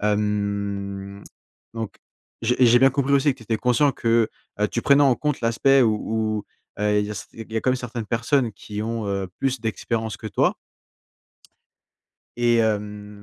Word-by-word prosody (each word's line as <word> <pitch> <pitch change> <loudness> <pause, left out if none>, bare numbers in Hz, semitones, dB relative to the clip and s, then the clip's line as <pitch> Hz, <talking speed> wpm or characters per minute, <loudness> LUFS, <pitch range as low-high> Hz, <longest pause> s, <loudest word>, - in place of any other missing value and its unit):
Hem, 100 -1 -2 0.5
donc, 115 -2 -5 0.4
j'ai 120 +2 +1
j'ai 120 0 +6
bien 135 +2 +6
compris 140 +1 0
aussi 140 +1 +3
que - - -19
tu - - -13
étais 110 0 -1
conscient 125 +5 +3
que, 115 -3 +2 0.3
heu, 105 - +2
tu 115 - -2
prenais 140 +2 +5
en 135 -4 +4
compte 150 -2 -1
l'aspect 130 +4 +4
où 110 -3 +3
où, 110 -1 -2 0.4
heu, 105 0 +2
il 105 +2 -7
y 115 - -2
a - - +1
quand 130 - +1
même 130 - +1
certaines 115 -2 -5
personnes 115 +1 +1
qui 105 +1 -7
ont, 115 0 -3
heu, 100 -1 -2
plus 135 -2 -1
d'expérience 110 0 -2
que 110 - -8
toi 100 - +1 1.8
et, 120 -1 +3
hem, 105 -2 -2
110 Hz, 170 wpm, -23 LUFS, 105-120 Hz, 1.8 s, j'ai